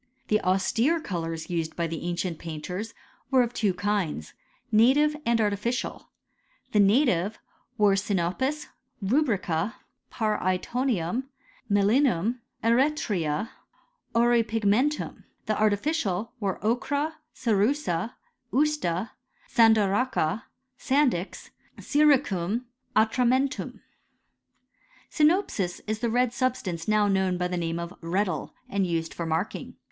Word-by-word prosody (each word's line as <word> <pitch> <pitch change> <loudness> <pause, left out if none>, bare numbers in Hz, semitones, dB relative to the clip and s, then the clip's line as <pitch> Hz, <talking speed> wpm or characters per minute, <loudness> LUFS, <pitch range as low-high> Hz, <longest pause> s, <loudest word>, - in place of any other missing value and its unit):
The 215 0 +3
austere 225 - +2
colours 165 - -4
used 165 -2 -2
by 170 - -1
the 165 -1 -4
ancient 175 -1 -2
painters 180 +7 -6 0.3
were 260 -2 +5
of 240 0 -4
two 210 -5 +1
kinds, 180 - -2 0.4
native 270 +8 +4
and 235 -1 +3
artificial. 210 +3 -1 0.6
The 210 - +3
native 205 - +3 0.4
were 205 -2 +5
siriopis, 200 - -1 0.4
rubrica, 205 - +1 0.4
parcRtonium, 215 +1 -1 0.5
melinum, 220 +1 +3 0.2
eretria, 230 - +1 0.7
auripigmentum. 230 +3 +2 0.2
The 215 -1 -1
artificial 215 - 0
were, 195 -3 -1
ochra, 285 +7 0 0.2
cerussel. 225 - +1 0.4
usta, 245 - 0 0.4
sandaracha, 220 -2 +3 0.3
sandy 275 -6 +3
x, 180 +4 -8 0.3
syricum, 250 - +2 0.3
atramentum, 250 +5 +1 1.3
Sinopis 300 - +1
is 215 0 -2
the 235 0 0
red 245 +1 +2
substance 235 -10 -2
now 215 -1 +3
knovm 190 -2 +1
by 180 0 0
the 180 - -3
name 165 -1 -2
of 170 +1 -5
reddle, 185 +3 -2
and 195 -2 0
used 165 -1 -2
for 170 - -4
marking. 165 +6 -3
215 Hz, 100 wpm, -27 LUFS, 180-250 Hz, 1.3 s, were